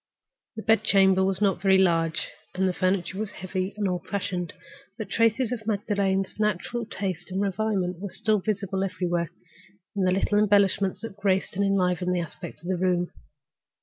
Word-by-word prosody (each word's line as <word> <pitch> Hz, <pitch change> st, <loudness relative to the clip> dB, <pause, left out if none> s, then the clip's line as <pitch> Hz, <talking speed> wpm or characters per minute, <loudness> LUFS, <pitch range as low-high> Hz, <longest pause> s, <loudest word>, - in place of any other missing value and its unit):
The 220 Hz, -, -6 dB
bed 225 Hz, 0 st, +4 dB
chamber 190 Hz, -1 st, +4 dB
was 190 Hz, +1 st, +1 dB
not 195 Hz, -4 st, +2 dB
very 190 Hz, -1 st, +5 dB
large, 165 Hz, -3 st, +2 dB, 0.3 s
and 190 Hz, +1 st, +2 dB
the 185 Hz, -, 0 dB
furniture 185 Hz, +1 st, 0 dB
was 215 Hz, -1 st, -2 dB
heavy 185 Hz, +1 st, -4 dB
and 205 Hz, -2 st, 0 dB
old 180 Hz, -1 st, -3 dB
fashioned. 180 Hz, -3 st, -2 dB, 0.5 s
But 220 Hz, -, -5 dB
evidences 230 Hz, +2 st, +2 dB
of 225 Hz, -3 st, -4 dB
Magdalen's 200 Hz, -2 st, 0 dB
natural 215 Hz, +3 st, -1 dB
taste 185 Hz, -5 st, -4 dB
and 190 Hz, +1 st, -2 dB
refinement 195 Hz, -2 st, 0 dB
were 210 Hz, +2 st, 0 dB
visible 195 Hz, -2 st, -1 dB
everywhere, 175 Hz, -3 st, -1 dB, 0.7 s
in 200 Hz, -, 0 dB
the 185 Hz, -1 st, +3 dB
little 195 Hz, +2 st, +2 dB
embellishments 200 Hz, -2 st, +3 dB
that 225 Hz, -3 st, -7 dB
graced 195 Hz, -2 st, 0 dB
and 200 Hz, -, +1 dB
enlivened 180 Hz, -2 st, +1 dB
the -, -, +1 dB
aspect 165 Hz, -1 st, -7 dB
of -, -, -8 dB
the 185 Hz, -1 st, 0 dB
room. 180 Hz, -1 st, +1 dB
195 Hz, 170 wpm, -26 LUFS, 185-205 Hz, 0.7 s, very